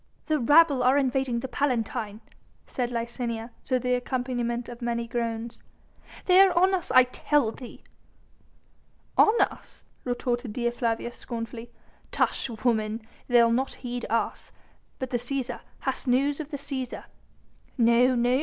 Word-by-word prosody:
"The 310 -1 +1
rabble 290 +2 +5
are 255 +3 +4
invading 265 -3 0
the 265 - -4
Palatine," 230 -5 -2 0.4
said 245 -2 -3
Licinia, 235 -1 -4
to 255 - +1
the 250 0 0
accompaniment 245 -1 -2
of 240 0 -9
many 235 -1 -2
groans. 230 -1 -3 0.6
"They 365 0 +6
are 380 -3 +4
on 375 +2 +4
us 360 -2 -1
I 255 - +7
tell 250 -1 +1
thee." 245 +1 -11 1.3
"On 440 +2 +5
us!" - - -2 0.2
retorted 245 -2 -2
Dea 240 0 0
Flavia 235 -1 -2
scornfully. 230 0 -7 0.4
"Tush, - - 0 0.2
woman! 220 -1 +1 0.2
they'll 235 -2 +5
not 260 +3 0
heed 245 0 -4
us.... 230 +1 -2 0.5
But 260 -1 -5
the 245 - +1
Cæsar... 245 0 -3 0.2
Hast 265 0 -3
news 275 +4 +2
of 305 -2 -5
the 285 - -4
Cæsar?" 270 -3 -5 0.7
"No! 240 +2 +4
no! 245 +2 +2
245 Hz, 140 wpm, -26 LUFS, 235-265 Hz, 1.3 s, I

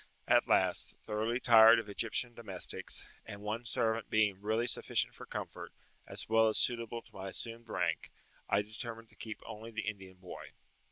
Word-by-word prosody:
At - - +5
last, - - +2
thoroughly 110 +3 0
tired 115 -2 +9
of 115 - -2
Egyptian 115 +3 -3
domestics, 105 -6 -7 0.2
and 100 0 -8
one 110 +3 -3
servant 110 -1 0
being 105 -3 +2
really 110 +3 +1
sufficient 125 - -1
for - - -11
comfort, - - -6 0.4
as - - -7
well 110 0 +5
as 110 - +2
suitable 115 -1 0
to - - -22
my 95 0 -6
assumed 115 +3 -7
rank, 85 -3 -1 0.4
I 100 - +3
determined 115 +1 -7
to - - -22
keep 110 -1 -7
only 110 +2 -7
the 110 -1 -4
Indian 95 -3 -5
boy. 90 -1 -9
110 Hz, 170 wpm, -34 LUFS, 105-115 Hz, 0.4 s, tired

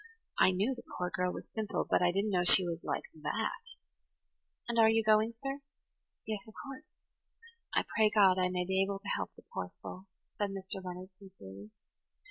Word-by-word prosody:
"I - - +7
knew 200 +8 +1
the 245 - -9 0.2
poor 180 0 -2
girl 180 0 0
was - - -9
simple, 220 -2 -2
but - - +2
I 175 0 +4
didn't 200 +3 0
know 180 -2 +2
she 180 +1 +8
was 170 -1 -4
like - - -2 0.2
that. 150 - -3 0.9
And 235 -1 0
are 220 -1 +7
you 225 0 +3
going, 215 +1 +3
sir?" 275 +1 -3 0.7
"Yes, 215 -1 -2
of 220 - -14
course. 275 +2 -9 0.9
I - - +2
pray 215 -1 +3
God 195 -3 +5
I 180 0 +2
may 180 0 -1
be 190 +1 +1
able 195 0 0
to 200 +1 -12
help - - -3
the - - -16
poor 90 -1 -3
soul," 185 - -10 0.3
said 205 -1 +1
Mr. 190 -1 -6
Leonard 185 +1 -7
sincerely. 185 - -12
195 Hz, 190 wpm, -32 LUFS, 180-215 Hz, 0.9 s, she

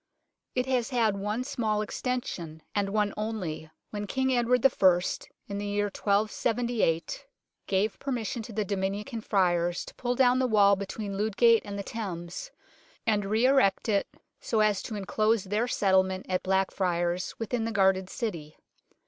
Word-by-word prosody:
It 250 0 +1
has 255 -3 0
had 230 -6 +2
one 210 +5 -2
small 220 -6 -1
extension, 185 -10 -4
and 200 -1 0
one 210 0 +1
only, 195 -8 -4 0.2
when 205 -1 -4
King 265 +3 0
Edward 245 +1 +2
I. 185 -9 +5 0.5
in 200 -1 -4
the 205 - -3
year 205 0 0
1278 215 -3 0 0.4
gave 200 +2 0
permission 245 -3 -3
to 225 - -9
32 215 0 -1
UNKNOWN 205 - -4
LONDON 195 -1 0
the 190 - +2
Dominican 225 +2 -6
Friars 175 -4 +1
to - - -11
pull 245 -1 -2
down 255 0 +4
the 260 - +2
wall 200 -3 +5
between 200 +1 -5
Ludgate 220 +2 +4
and 200 0 -6
the 200 - -3
Thames, 185 - -5 0.6
and 210 -3 +1
re 220 +4 +2
erect 260 -8 +3
it 205 -3 +1 0.3
so 220 -2 0
as 210 -2 +2
to 220 - -6
enclose 215 +1 +1
their 210 +5 0
settlement 190 -4 +2
at 185 -1 0
Blackfriars 185 -2 0
within 225 0 -2
the 230 - -2
guarded 190 -2 +2
city. 170 - -5
210 Hz, 165 wpm, -28 LUFS, 190-230 Hz, 0.6 s, I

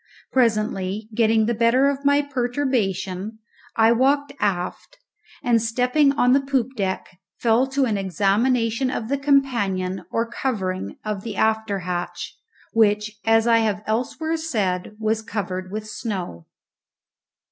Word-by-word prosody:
Presently, 215 -4 0
getting 220 -1 +3
the 235 - +1
better 235 +4 +3
of 280 0 -1
my 285 +1 +4
perturbation, 240 -7 -2 0.4
I 225 0 +5
walked 280 +4 +2
aft, 195 - -2 0.5
and, 235 -3 +3
stepping 250 +5 +2
on 250 -3 +3
to 275 - +5
the 275 - -8
poop 265 -3 +1
deck, 190 -3 -3 0.2
fell 235 +3 +2
to 270 0 +1
an 215 -5 0
examination 225 - +1
of 230 -3 -4
the 280 - +1
companion 205 - +1
or 230 - 0
covering 195 -7 -3
of 210 -2 -3
the 220 -1 -6
after 220 -2 0
hatch, 175 0 -4 0.4
which, 210 -1 +2
as 225 0 +4
I 230 -1 +5
have 215 -2 0
elsewhere 255 +9 -1
said, 210 - -2
was 220 0 0
covered 190 -4 -4
with 215 +1 -5
snow. 190 - -5
225 Hz, 135 wpm, -23 LUFS, 200-255 Hz, 0.5 s, I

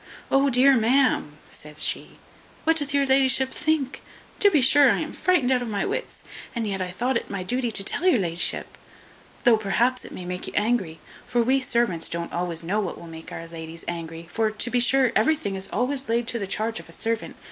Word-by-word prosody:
"O 275 +1 +4
dear 265 +2 +5
ma'am!" 235 - +2
says 150 0 -3
she, - - -1 0.5
"what 325 0 +3
doth 290 -2 0
your 280 -1 +2
la'ship 265 0 +3
think? 295 -3 -1 0.4
To 410 - +6
be 320 -7 +3
sure 275 +2 +6
I - - +1
am - - -4
frightened 325 -9 +1
out 250 -1 +2
of 245 - -4
my 205 -3 -2
wits; - - -4 0.3
and 230 -1 -2
yet 195 -2 -3
I 180 - -2
thought 240 +8 -1
it - - -7
my 195 -2 -4
duty 245 +5 -1
to 205 -3 +1
tell 350 - +1
your 360 - +5
la'ship, 170 -4 -1 0.6
though 240 -3 +5
perhaps 235 +5 0
it - - -11
may 180 - -8
make 180 0 -4
you - - -7
angry, 205 -7 0 0.3
for 240 -1 +1
we 265 +3 +2
servants 235 -9 0
don't 170 0 -4
always 170 -1 -3
know 195 +6 -1
what 195 -5 -3
will - - -11
make 160 -1 -10
our 165 - -7
ladies 165 0 -8
angry; 165 -1 -5
for, 225 -1 +1
to 215 +3 -1
be 245 - +2
sure, 255 0 +4
everything 225 -3 +1
is 190 0 -2
always 260 +2 -1
laid 230 0 0
to 235 - -1
the 200 - -4
charge 220 +3 -1
of - - -13
a - - -13
servant. 225 0 -3
230 Hz, 220 wpm, -24 LUFS, 185-265 Hz, 0.6 s, To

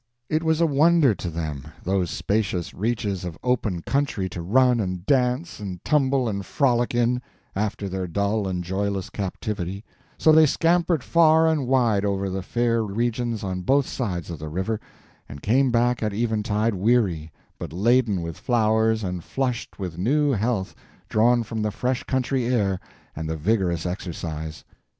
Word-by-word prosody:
It 155 +1 +1
was 160 -1 +1
a 170 - +4
wonder 155 -2 +4
to 90 - -5
them—those 80 +3 -3
spacious 90 -1 -1
reaches 105 -3 -2
of 85 -3 -6
open 110 -9 0
country 135 -9 0
to 85 0 -6
run 125 +7 +3
and 90 -3 -3
dance 130 +4 +1
and 95 -4 -7
tumble 135 -4 +2
and 100 -2 -2
frolic 120 0 +1
in, 120 +1 +2 0.3
after 105 0 -2
their 95 -1 -3
dull 100 +4 0
and 90 -1 -2
joyless 95 +1 -2
captivity; 100 -1 -4 0.3
so 160 - +5
they 155 0 +7
scampered 165 0 +2
far 160 -1 +5
and 155 -5 +1
wide 120 -6 +2
over 100 -1 -1
the 95 +1 -2
fair 115 +3 0
regions 115 +2 -2
on 95 -1 -3
both 135 +8 +3
sides 90 -9 -3
of 85 - -6
the 80 0 -6
river, 95 +7 -2 0.5
and 70 0 -10
came 130 +5 +3
back 120 +1 +2
at 105 -2 -1
eventide 110 -1 0
weary, 95 -6 +1 0.3
but - - -6
laden 105 0 +2
with 85 -1 -6
flowers 110 -1 +2
and 90 -2 -3
flushed 125 -3 -3
with 90 -4 -5
new 145 +8 +2
health 110 -4 -1 0.4
drawn 120 +2 +3
from 110 0 -4
the 105 - 0
fresh 125 +4 -1
country 130 -1 0
air 100 -7 +1 0.4
and 80 +1 -4
the 80 - -2
vigorous 90 -1 0
exercise. 80 -4 -5
110 Hz, 160 wpm, -24 LUFS, 95-125 Hz, 0.5 s, they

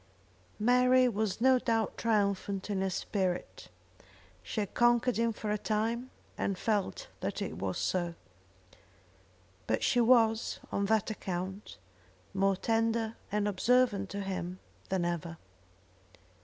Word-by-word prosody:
Mary 250 +3 +4
was 215 -4 -1
no 260 +1 +5
doubt 225 -2 0
triumphant 200 -2 0
in 195 -2 0
her 190 - +1
spirit. 180 - -3 0.7
She 155 - -4
had 200 - -5
conquered 240 0 +3
him 230 0 +2
for 215 -1 -4
a 210 - 0
time, 230 +4 -1 0.3
and 195 - -1
felt 215 - -1
that - - -3
it - - -4
was - - -2
so. 175 -2 -1 1.5
But 110 - 0
she 245 - +3
was, 225 -2 +3
on 200 - 0
that 220 0 +2
account, 190 0 -5 0.6
more 195 0 +2
tender 225 +2 0 0.2
and 210 0 +1
observant 205 -1 +2
to 200 +1 -4
him 185 -2 -4 0.3
than 185 -2 0
ever. 170 -1 -3
210 Hz, 130 wpm, -31 LUFS, 190-230 Hz, 1.5 s, no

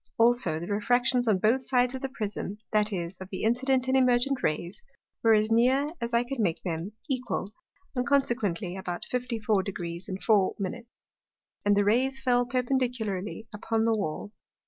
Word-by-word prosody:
Also 230 -9 +3
the 170 - -5
Refractions 245 +5 +1
on 210 -3 +4
both 225 +7 +2
sides 250 -1 +1
the 265 +1 -4
Prism, 210 -4 -4
that 215 0 +2
is, 180 -1 -4
of 190 - -8
the 190 - -5
Incident, 255 +3 +1
and 260 - +2
Emergent 255 +1 +3
Rays, 170 +5 -2 0.4
were 225 -1 +5
as 215 +1 +1
near, 255 +5 +4 0.2
as 235 0 -2
I 235 0 +3
could 255 +1 -5
make 180 -7 0
them, 175 +3 -4
equal, 255 -7 -2 0.4
and 250 - +1
consequently 220 -10 0
about 180 -2 -4
54° 200 -7 -2
4'. 205 -4 +3 1.1
And 205 0 +3
the 205 - +3
Rays 260 +6 +2
fell 245 -2 +2
perpendicularly 240 -5 -2
upon 220 +2 -1
the 230 - +3
Wall. 205 0 -3
225 Hz, 155 wpm, -28 LUFS, 195-250 Hz, 1.1 s, were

